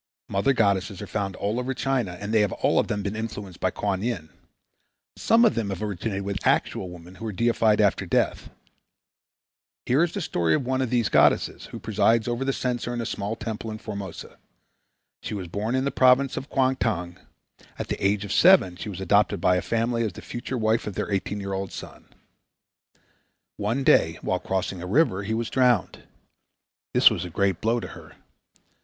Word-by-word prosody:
Mother 100 +8 +2
goddesses 100 -4 +1
are - - -5
found 100 -3 -3
all 105 +4 -2
over 130 +1 -3
China 125 -9 -1
and 105 +2 -4
they 110 - +5
have 105 - +1
all - - +2
of - - 0
them 105 -1 -2
been 100 +1 -3
influenced 105 -5 -6
by 95 - +1
Kuan 95 0 -2
Yin. 95 -10 -3 0.8
Some 230 +1 +4
of 220 - +4
them 115 -4 -2
have 95 +1 -4
originated 100 0 -3
with 100 -1 -3
actual 95 - +1
women 90 0 -12
who 105 +4 -9
were 110 - -2
deified 115 0 +2
after 100 -5 +2
death. - - 0 1.4
Here 135 +7 +3
is 170 - 0
the 200 - -4
story 85 - +1
of 140 - -2
one 130 +1 0
of 130 - -1
these 120 -3 +1
goddesses - - +2
who - - -8
presides 110 +2 +2
over 120 +2 -1
the 135 - +1
censer 125 -2 -2
in - - -3
a 115 - -2
small 105 +1 -3
temple 110 0 -5
in 110 - -5
Formosa. 100 -5 -8 0.8
She - - -5
was 95 -3 -5
born 105 +7 -2
in 130 +1 0
the 140 - 0
province 130 +1 +4
of 135 - -6
Kuangtung. 110 -10 0 0.6
At - - -5
the - - -3
age 100 +1 +1
of 100 - -3
seven 175 - +5
she 105 - -6
was 95 -2 -7
adopted 100 +2 +2
by 90 - +3
a 90 - +1
family 115 +1 0
as 110 -5 -2
the - - -11
future 125 +2 -5
wife 110 0 +1
of 105 - -5
their - - -3
eighteen 100 +1 -2
year 100 -1 -4
old 95 0 -3
son. - - -10 1.5
One 115 +6 -1
day 80 -9 +4
while 90 - 0
crossing 95 -1 -3
a 90 - -6
river 100 - +2
he 110 +2 -2
was 115 0 -3
drowned. 125 -6 +1 0.9
This - - +6
was 85 - -2
a 90 - -6
great 95 +1 0
blow 115 +2 +1
to - - -7
her. - - -12
105 Hz, 200 wpm, -25 LUFS, 95-120 Hz, 1.5 s, This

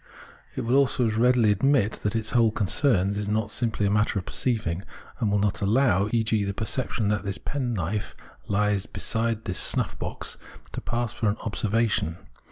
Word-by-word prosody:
It - - -2
will 120 +3 +1
also 130 -3 +2
as 110 -1 0
readily 120 -2 +4
admit 110 0 +2
that 105 +1 -1
its 110 -1 -1
whole 115 -2 +4
concern 100 -1 +2
is 100 0 -3
not 105 0 -1
simply 110 -3 0
a 100 - +1
matter 105 0 +1
of 95 - -3
perceiving, 105 -9 -1 0.4
and 110 - +1
will 100 - +2
not 105 +1 0
allow, 105 -2 +2
e.g. 110 -2 +1
the 100 0 -3
perception 110 -1 -1
that 105 -2 0
this 100 -1 -1
penknife 110 - -3 0.3
lies 105 0 +1
beside 115 -1 -1
this 90 - -1
snuff - - +1
box - - -4 0.3
to - - -5
pass 120 -1 -2
for 110 - 0
an 105 - -1
" - - -11
observation." 110 -6 0
110 Hz, 180 wpm, -26 LUFS, 100-115 Hz, 0.4 s, readily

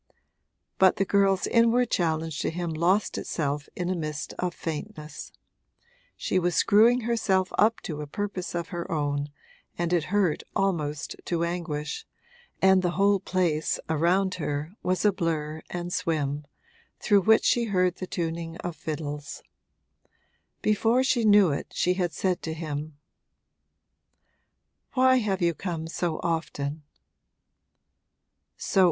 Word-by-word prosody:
But 190 -1 +6
the 195 - +1
girl's 195 -1 +3
inward 235 +1 +3
challenge 160 -3 0
to - - 0
him 170 0 -3
lost 180 +6 +1
itself 145 -2 -3
in 180 - -2
a 185 - 0
mist 155 -3 -4
of 180 -1 0
faintness; 155 -1 -6 0.9
she 185 - 0
was 175 -1 0
screwing 230 +4 +5
herself 215 -5 +1
up 220 +2 +4
to 150 -3 -5
a 150 - -6
purpose 190 +1 -4
of 170 -1 -3
her 175 -2 -5
own, 145 -2 -1 0.5
and 175 0 -1
it 170 -3 +2
hurt 185 -4 +1
almost 155 -7 -1
to 170 -1 0
anguish, 170 - -3 0.6
and 190 -1 +6
the 175 -1 0
whole 200 0 +4
place, 175 -5 0
around 180 +5 +2
her, 145 +2 -2
was 185 +1 0
a 210 - +6
blur 160 -4 -2
and 175 0 -4
swim, 145 -2 -1 0.5
through 205 -2 +4
which 220 +3 +4
she 240 -1 +3
heard 185 -4 +1
the 185 - -5
tuning 165 -1 -3
of 175 -2 -5
fiddles. 150 -2 -5 1.2
Before 225 +4 +3
she 245 -3 +2
knew 205 -5 +6
it 140 - -4
she 180 - +2
had 180 -2 -1
said 185 0 -1
to 160 -1 -4
him, 155 -2 -5 2.0
'Why 260 -1 +5
have 200 -6 0
you 170 0 +3
come 165 -1 -4
so 165 -1 -2
often?' 160 -3 -2
175 Hz, 135 wpm, -27 LUFS, 155-195 Hz, 2.0 s, But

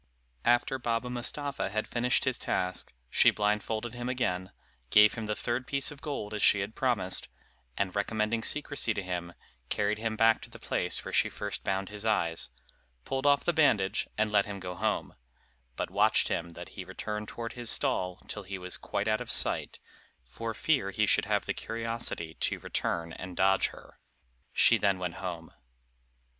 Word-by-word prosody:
After 120 +2 +3
Baba 120 0 -1
Mustapha 130 0 -1
had 110 +2 -2
finished 125 +1 +2
his 130 -2 +1
task, 90 -1 -2 0.2
she - - +6
blindfolded 110 +2 -1
him 120 0 -4
again, 95 -7 -1 0.4
gave 105 - +7
him 110 -2 -5
the 105 - -1
third 120 +3 -2
piece 140 0 +1
of 145 -1 -11
gold 135 -9 -4
as 105 - -3
she 100 - +5
had 100 +3 -4
promised, 110 -9 0 0.5
and 95 -1 -1
recommending 110 +2 0
secrecy 145 -4 +2
to 100 - -2
him, 90 -1 -4 0.4
carried 105 +1 0
him 110 0 -1
back 115 +1 +4
to - - -10
the - - -11
place - - 0
where - - -6
she - - +3
first 105 0 -5
bound 95 0 -1
his 105 0 -6
eyes, 85 -7 +1 0.6
pulled 135 +1 -1
off 140 0 +5
the 175 - +1
bandage, 125 -12 +3
and 110 0 +1
let 100 -1 +3
him 100 -1 -5
go 90 -1 -5
home, - - -1 0.6
but - - -3
watched - - +3
him 85 0 -1
that 85 - -9
he - - -7
returned 105 0 -5
toward 115 +1 -5
his 120 -2 -4
stall, 90 -11 0
till 105 - -4
he 95 0 -6
was 90 0 -1
quite - - -2
out 110 +2 +2
of 125 - -6
sight, - - +1 0.4
for 115 - -5
fear 135 -9 +1
he 105 +2 +1
should - - +3
have - - +1
the - - -1
curiosity 115 -8 -3
to - - -1
return 85 -1 -2
and 90 -2 -8
dodge 95 0 +4
her; - - -14 0.5
she - - +5
then 100 -2 +2
went 90 -2 -3
home. 85 -3 -5
105 Hz, 180 wpm, -30 LUFS, 95-120 Hz, 0.6 s, gave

